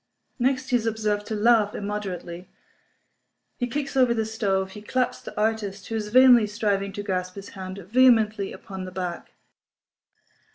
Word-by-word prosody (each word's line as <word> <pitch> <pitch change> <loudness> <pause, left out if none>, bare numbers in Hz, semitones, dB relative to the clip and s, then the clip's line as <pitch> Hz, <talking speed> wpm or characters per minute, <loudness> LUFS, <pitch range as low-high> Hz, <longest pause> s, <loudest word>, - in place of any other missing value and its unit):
Next 260 +1 0
he 250 - +4
is 230 -1 -3
observed 210 -2 -1
to 220 - -3
laugh 215 -1 +3
immoderately; 190 -4 -5 1.1
he 245 - 0
kicks 275 +3 -4
over 250 -3 +4
the 220 -1 0
stove; 195 -3 -1
he 210 - -10
claps 250 +4 -1
the - - -8
artist 210 -3 -2
(who 225 - -3
is 215 -1 -2
vainly 245 -1 +6
striving 205 -2 -1
to 205 - -5
grasp 185 -2 -3
his 200 0 -9
hand) 190 -1 -8
vehemently 215 0 +3
upon 190 -1 -8
the 185 - -8
back. 180 -2 -5
210 Hz, 160 wpm, -25 LUFS, 195-230 Hz, 1.1 s, vainly